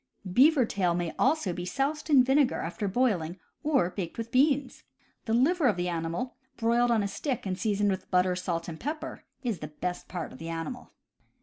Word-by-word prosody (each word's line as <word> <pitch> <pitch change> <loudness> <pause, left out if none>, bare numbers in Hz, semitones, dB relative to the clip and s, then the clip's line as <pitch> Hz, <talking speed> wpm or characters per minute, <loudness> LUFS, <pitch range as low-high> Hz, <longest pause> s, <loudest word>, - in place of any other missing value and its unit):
Beaver 275 - +6
tail 185 -5 0
may 175 -2 -2
also 265 - +2
be 175 - -5
soused 280 - -2
in 275 -4 +7
vinegar, 270 +1 +3
after 190 +5 -3
boil 215 -2 +2
ing, 165 +3 -6 0.2
or 275 - +2
baked 175 -4 -5
with 230 0 -5
beans. 275 +1 +2 0.4
The 225 - -1
liver 295 +5 +3
of 210 -6 +2
the 180 0 -1
animal, 170 +9 -3 0.2
broiled 235 +1 +2
on 225 -3 +3
a - - 0
stick 255 +4 -3
and 190 -1 -1
seasoned 205 0 +1
with 190 -1 -4
butter, 180 0 +3
salt, 175 -2 -3
and 160 -2 -7
pepper, 310 +3 -5 0.2
is 230 -8 -1
the 150 - -5
best 175 +4 -5
part 175 -3 -5
of - - -12
the 165 +1 -6
animal. 165 +10 -5
210 Hz, 200 wpm, -28 LUFS, 175-260 Hz, 0.4 s, in